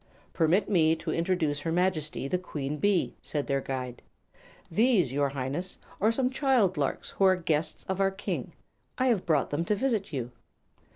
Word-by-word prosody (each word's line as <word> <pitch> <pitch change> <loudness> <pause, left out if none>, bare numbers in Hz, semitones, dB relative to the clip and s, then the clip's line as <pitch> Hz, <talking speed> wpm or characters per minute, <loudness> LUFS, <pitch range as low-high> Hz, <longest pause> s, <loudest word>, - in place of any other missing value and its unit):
"Permit 175 +5 +2
me 165 -5 +4
to 160 - -4
introduce 165 -4 0
her 165 +3 -3
Majesty 165 -5 0
the 180 +6 0
Queen 150 -5 -4
Bee," 200 +2 +1
said 145 -2 -2
their 140 -1 0
guide. 130 -2 -5 0.7
"These, 195 - +3
your 140 0 +1
highness, 140 +7 -4 0.2
are 215 +3 +4
some 255 +3 0
little 260 - -7
child 250 -10 +3
larks 140 -3 -2
who - - -1
are 190 0 +6
guests 160 -3 -1
of 190 +1 -2
our 195 - +4
King. 195 +1 -4 0.4
I 260 - +1
have 210 -7 +1
brought 150 -5 +2
them 145 +3 0
to 210 - +1
visit 220 -3 -1
you." 125 -4 -3
170 Hz, 180 wpm, -28 LUFS, 145-195 Hz, 0.7 s, are